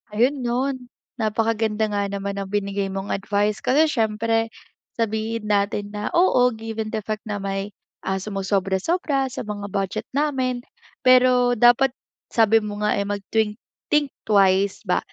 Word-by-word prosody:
Ayun 255 +6 +2
'no, 250 +2 0 0.5
napakaganda 220 -1 0
nga 200 -1 0
naman 200 0 -4
ng 195 - -4
binigay 200 0 -1
mong 195 +1 -4
advice 205 +1 0
kasi 300 +4 +3
siyempre, 225 -1 +1 0.5
sabihin 225 0 -2
natin 205 0 0
na, 210 0 -4
oo, 340 -8 +5
given 220 0 -5
the 215 - -3
fact 215 +1 -5
na 210 - -2
may, 195 +1 -3 0.3
ah, 190 - +1
sumosobra-sobra 200 - 0
sa 255 - -6
mga 205 -2 -5
budget 195 -2 -3
namin. 260 -4 0 0.4
Pero 250 -2 +5
dapat 245 +3 +5 0.4
sabi 225 -1 +4
mo 205 -1 -5
nga, 210 0 +1
eh, 200 - 0
mag-think 210 +2 -1 0.3
think 295 -1 +4 0.2
twice 195 -1 +3
ba, 180 - +2
215 Hz, 145 wpm, -23 LUFS, 200-240 Hz, 0.5 s, oo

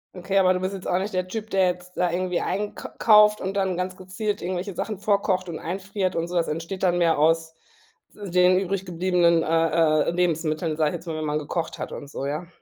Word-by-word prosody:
Okay, 190 +2 0
aber 185 -1 +4
du 180 - -1
bist 185 +1 -2
jetzt 190 -2 -7
auch 180 - +1
nicht 195 +3 -3
der 185 0 -1
Typ, 220 +3 -6
der 190 -1 +3
jetzt 180 0 -4
da 180 -1 +1
irgendwie 180 0 -1
eink. 205 +1 -3
kauft 210 -1 +6
und 190 +1 -3
dann 190 -3 0
ganz 185 0 -3
gezielt 190 +3 -4
irgendwelche 185 +2 -3
Sachen 215 +4 -4
vorkocht 200 -2 0
und 160 - -5
einfriert 190 +1 -3
und 165 0 -1
so. 180 - -6
Das 170 -1 +1
entsteht 165 +5 -4
dann 175 -1 +3
mehr 170 -2 +3
aus 160 +1 +2 0.6
w 200 -4 -8
den 180 +1 +5
übrig 195 0 -2
gebliebenen, 175 -1 +2
äh 165 -1 +2
äh, - - 0
Lebensmitteln, 165 -2 0
sage 155 -2 +2
ich - - -6
jetzt 175 - -8
mal, 165 - -4
wenn 155 0 -3
man 150 0 0
mal - - -3
gekocht 165 +3 -3
hat - - -5
und 145 - -8
so, 135 - -5
ja? 150 +5 -3
180 Hz, 240 wpm, -24 LUFS, 165-190 Hz, 0.6 s, kauft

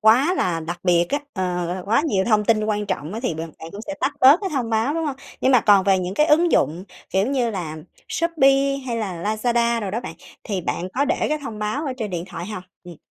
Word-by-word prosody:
quá 255 +11 +5
là 175 - 0
đặc 170 +2 -5
biệt 175 -1 +4
á, 285 - +1 0.2
ờ, 180 -2 -1
gọi 175 - -2
là, 185 - -6
quá 230 +7 +2
nhiều 190 -9 +1
thông 215 -2 +2
tin 215 0 +2
quan 210 -1 -1
trọng 155 -2 -3
á, 225 - -4
thì 210 - -1
bạn 160 +1 -6
bạn 160 - -8
cũng 200 - -7
sẽ 295 - -4
tắt 285 - +1
bớt 275 +6 +7
cái 390 -2 -3
thông 250 -5 -1
báo, 225 +6 +1
đúng 325 -1 -1
hông? 280 -2 -3 0.2
Nhưng 260 - +3
mà 250 - +6
còn 200 -3 +5
về 195 -1 +4
những 185 +1 -3
cái 300 - +3
ứng 330 +3 +4
dụng, 170 +5 +1 0.3
kiểu 190 +3 +2
như 255 -3 0
là, 170 -7 -5 0.3
Shopee, 275 -4 +2
hay 235 - -2
là 190 -7 -4
Lazada 235 +2 +1
đồ 200 -3 -3
đó 220 +4 -2
bạn, - - -7 0.3
thì 200 -3 -2
bạn 175 +1 -3
có 280 - +2
để - - 0
cái 305 - 0
thông 225 -6 -6
báo 215 +8 -2
ở 270 - -1
trên 220 -5 -4
điện 175 -1 -3
thoại 180 -2 -7
hông? 210 -3 -6 0.2
Ừm. 175 -2 -10
215 Hz, 265 wpm, -22 LUFS, 185-265 Hz, 0.3 s, bớt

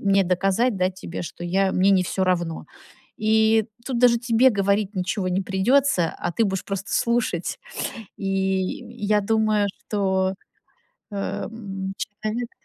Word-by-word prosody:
мне 195 -1 +3
доказать, 195 +6 +1
да, 185 0 +1
тебе, 180 -2 -7
что 175 +1 -7
я 190 +2 +1
мне 190 +2 +3
не 190 -2 +4
всё 190 +1 0
равно?" 175 -3 -1 0.5
И 220 0 +3 0.2
тут 255 -3 -1
даже 240 -1 +5
тебе 240 +2 +4
говорить 200 0 +1
ничего 185 +1 -1
не 185 +2 0
придется, 195 -1 +2
а - - -2
ты 225 - +2
будешь 190 -1 -2
просто 195 0 -4
слушать. 235 -7 0 0.6
И 195 - -8
я 195 +2 0
думаю, 215 0 +2 0.2
что, 190 -2 +1 0.8
э, - - -6
м, 195 -2 -4
человек. 215 +3 -4
195 Hz, 140 wpm, -24 LUFS, 190-220 Hz, 0.8 s, даже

